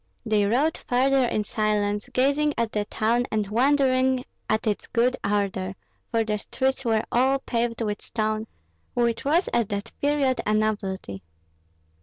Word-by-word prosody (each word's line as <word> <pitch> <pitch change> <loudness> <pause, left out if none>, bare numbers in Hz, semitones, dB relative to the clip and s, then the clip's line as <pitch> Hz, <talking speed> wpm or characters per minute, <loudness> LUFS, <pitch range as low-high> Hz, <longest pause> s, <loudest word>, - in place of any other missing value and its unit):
They 210 -2 +2
rode 280 +9 +1
farther 265 +1 +2
in 215 - 0
silence, 210 +1 -1
gazing 285 +4 +2
at 230 -2 0
the 210 -1 -1
town 235 +4 0
and 215 -2 0
wondering 260 +1 +3 0.3
at 215 +2 +1
its 210 -2 -1
good 245 +2 +2
order; 195 -2 -1 0.3
for 230 -2 +1
the 210 -1 -2
streets 265 +4 -1
were 225 -3 +1
all 265 +3 +3
paved 235 -3 -2
with 210 -1 -3
stone, 215 0 -2 0.5
which 235 -1 +1
was 325 +6 +2
at 235 -4 +1
that 205 +3 -4
period 285 -3 +2
a 215 - +3
novelty. 195 - -2
230 Hz, 150 wpm, -25 LUFS, 210-260 Hz, 0.5 s, wondering